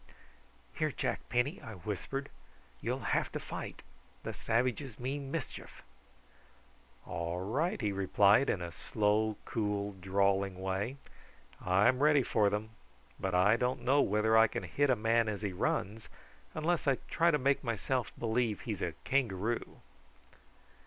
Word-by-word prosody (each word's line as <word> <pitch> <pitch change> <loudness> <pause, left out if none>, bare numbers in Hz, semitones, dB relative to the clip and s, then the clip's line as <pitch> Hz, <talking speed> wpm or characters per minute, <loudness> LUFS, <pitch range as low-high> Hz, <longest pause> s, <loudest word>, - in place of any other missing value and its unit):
"Here, - - 0
Jack - - -3
Penny," 125 +8 0
I 110 - -8
whispered, 105 +9 -4 0.5
"you'll - - -2
have - - +1
to - - -2
fight; - - -7 0.4
the - - -4
savages 125 +1 -1
mean 135 +2 -3
mischief." 155 -1 -6 1.2
"All 85 +2 -3
right!" 135 - -1
he 105 -5 0
replied 100 +5 +4
in 90 - 0
a 85 - -5
slow 105 +3 0
cool 105 -2 -1
drawling 95 0 +1
way, 95 +7 -2 0.7
"I'm 105 +8 +3
ready 150 -2 +5
for 105 -4 +2
them; 105 +2 -3 0.5
but 95 -1 -1
I 100 +5 +5
don't 125 0 -1
know 135 +4 +4
whether 105 +1 +2
I 110 0 +7
can - - -4
hit 145 0 +1
a 130 - +5
man 115 0 +2
as 105 0 -4
he 100 -2 -2
runs, 110 +3 -2 0.5
unless 160 0 0
I 135 - +5
try 170 +1 +3
to 150 - +3
make 140 0 +1
myself 120 +2 -1
believe 115 -2 0
he's - - -4
a - - -2
kangaroo." 115 -4 -1
110 Hz, 145 wpm, -32 LUFS, 100-130 Hz, 1.2 s, I